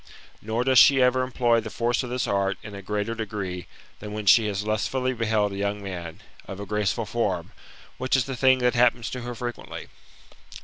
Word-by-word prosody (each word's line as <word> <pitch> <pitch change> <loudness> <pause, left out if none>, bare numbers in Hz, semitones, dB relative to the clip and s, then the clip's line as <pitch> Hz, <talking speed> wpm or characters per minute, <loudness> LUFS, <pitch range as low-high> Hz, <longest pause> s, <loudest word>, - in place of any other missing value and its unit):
Nor 110 +3 -1
does 130 0 +5
she 140 -3 +7
ever 125 0 +4
employ 120 -2 +2
the 110 -1 -6
force 120 +2 0
of 125 - -6
this 125 0 -1
art 100 -1 0
in 105 - -9
a 100 - -7
greater 105 +3 -2
degree, 100 -5 -5 0.3
than 105 0 -7
when 105 -1 -5
she 110 +2 +6
has 105 0 -2
lustfully 130 +4 -1
beheld 110 -3 0
a - - -5
young 100 +1 -1
man, 85 -4 -7 0.3
of 95 0 -7
a 100 - -5
graceful 105 -1 -1
form, - - -2 0.5
which 130 +1 +1
is 135 -1 +1
a 135 - -4
thing 130 +2 +4
that 125 - +3
happens 120 -1 +2
to 125 - -5
her 120 0 -6
frequently. 120 +1 -6
115 Hz, 205 wpm, -25 LUFS, 100-125 Hz, 0.5 s, she